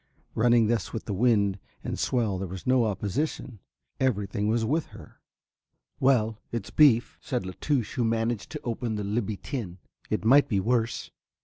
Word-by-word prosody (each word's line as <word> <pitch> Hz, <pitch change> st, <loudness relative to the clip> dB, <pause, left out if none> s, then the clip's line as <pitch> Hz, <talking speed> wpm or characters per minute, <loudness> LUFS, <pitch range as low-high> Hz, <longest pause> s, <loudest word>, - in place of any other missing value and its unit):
Running 120 Hz, 0 st, +4 dB
thus 110 Hz, -2 st, -1 dB
with 115 Hz, -, -4 dB
the 105 Hz, -, -3 dB
wind 100 Hz, -2 st, +2 dB, 0.2 s
and -, -, -4 dB
swell 110 Hz, -7 st, 0 dB
there 95 Hz, -, -3 dB
was 95 Hz, +1 st, -8 dB
no 130 Hz, -2 st, +3 dB
opposition, 110 Hz, +3 st, -2 dB, 0.4 s
everything 105 Hz, -5 st, 0 dB
was 110 Hz, +1 st, +1 dB
with 155 Hz, +7 st, 0 dB
her. -, -, -14 dB, 0.8 s
"Well, 115 Hz, -5 st, +2 dB
it's 115 Hz, -4 st, -4 dB
beef," 130 Hz, -6 st, +4 dB
said 125 Hz, -7 st, -3 dB
La 95 Hz, -, -5 dB
Touche 130 Hz, -8 st, 0 dB
who 125 Hz, -, -1 dB
had 115 Hz, -, +2 dB
managed 115 Hz, -1 st, -1 dB
to -, -, -5 dB
open 115 Hz, -1 st, -2 dB
the 105 Hz, -, -3 dB
Libby 105 Hz, 0 st, -2 dB
tin, 100 Hz, -10 st, -5 dB, 0.3 s
"it -, -, -1 dB
might 140 Hz, +4 st, +6 dB
be 100 Hz, -5 st, +2 dB
worse." 115 Hz, +3 st, 0 dB
115 Hz, 175 wpm, -27 LUFS, 105-125 Hz, 0.8 s, might